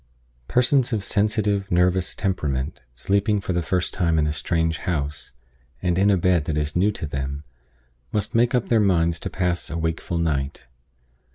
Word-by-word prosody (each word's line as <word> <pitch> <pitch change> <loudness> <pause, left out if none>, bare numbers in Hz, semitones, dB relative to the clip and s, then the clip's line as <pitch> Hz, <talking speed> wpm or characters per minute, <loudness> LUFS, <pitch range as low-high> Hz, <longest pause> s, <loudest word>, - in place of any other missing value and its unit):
PERSONS 125 0 +2
of 105 -3 -1
sensitive, 105 -1 0
nervous 90 +1 +2
temperament, 75 -9 -2
sleeping 100 - +1
for 95 -2 -3
the 85 - +1
first 90 +2 -1
time 85 -3 +1
in 75 - +3
a 75 - 0
strange 80 +1 0
house, 75 -4 -3 0.5
and 90 +3 0
in 95 +3 +3
a 100 - +4
bed 90 -3 +2
that 75 -1 -2
is 75 0 -2
new 95 +4 +3
to 80 - -5
them, 70 0 -4 0.7
must 105 +2 -1
make 120 +2 +3
up 125 - 0
their 115 - +4
minds 85 -5 +2
to - - -4
pass 90 -2 -1
a 80 - -3
wakeful 80 +1 -2
night. 75 -6 -1
90 Hz, 175 wpm, -23 LUFS, 80-100 Hz, 0.7 s, a